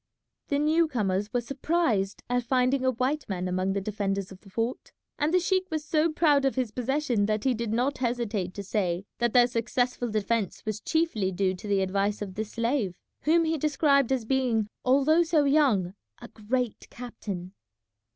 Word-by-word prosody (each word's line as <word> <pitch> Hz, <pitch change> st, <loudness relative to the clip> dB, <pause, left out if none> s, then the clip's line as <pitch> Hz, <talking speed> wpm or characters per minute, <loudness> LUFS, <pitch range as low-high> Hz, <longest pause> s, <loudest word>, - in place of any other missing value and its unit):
The 285 Hz, -, 0 dB
new 315 Hz, +3 st, +3 dB
comers 205 Hz, -6 st, -1 dB
were 245 Hz, -, 0 dB
surprised 255 Hz, -, -1 dB
at 245 Hz, 0 st, +1 dB
finding 255 Hz, +2 st, +1 dB
a 260 Hz, -, +3 dB
white 260 Hz, +3 st, -1 dB
man 185 Hz, -2 st, -2 dB
among 185 Hz, +1 st, 0 dB
the 200 Hz, -, -1 dB
defenders 195 Hz, -1 st, -2 dB
of 190 Hz, -, -11 dB
the 200 Hz, -, -16 dB
fort; 230 Hz, +5 st, -3 dB, 0.3 s
and 295 Hz, +2 st, +1 dB
the 365 Hz, -, +4 dB
sheik 375 Hz, +1 st, 0 dB
was 310 Hz, -1 st, -3 dB
so 310 Hz, +1 st, +2 dB
proud 300 Hz, -3 st, +3 dB
of 270 Hz, -, +1 dB
his 255 Hz, -4 st, -1 dB
possession 250 Hz, -3 st, 0 dB
that 215 Hz, 0 st, -1 dB
he 265 Hz, -, +2 dB
did 230 Hz, -2 st, -3 dB
not 255 Hz, +5 st, 0 dB
hesitate 230 Hz, -7 st, -2 dB
to 200 Hz, -, -5 dB
say 185 Hz, -2 st, -1 dB
that 240 Hz, -1 st, +1 dB
their 245 Hz, -1 st, +7 dB
successful 245 Hz, +1 st, -1 dB
defence 215 Hz, -1 st, -1 dB
was 215 Hz, -1 st, -3 dB
chiefly 320 Hz, -, 0 dB
due 185 Hz, 0 st, 0 dB
to 185 Hz, +3 st, -9 dB
the 200 Hz, -1 st, +2 dB
advice 200 Hz, +2 st, 0 dB
of 195 Hz, -2 st, -7 dB
this 215 Hz, +2 st, -5 dB
slave, 230 Hz, -5 st, 0 dB, 0.3 s
whom 330 Hz, +2 st, +4 dB
he 320 Hz, -1 st, 0 dB
described 280 Hz, -3 st, +2 dB
as 255 Hz, -4 st, 0 dB
being, 235 Hz, -4 st, +1 dB
although 280 Hz, +6 st, +4 dB
so 325 Hz, -3 st, +3 dB
young, 270 Hz, -, +3 dB, 0.3 s
a -, -, -10 dB
great 235 Hz, +2 st, -3 dB
captain. 200 Hz, -7 st, -7 dB
240 Hz, 185 wpm, -27 LUFS, 205-280 Hz, 0.3 s, their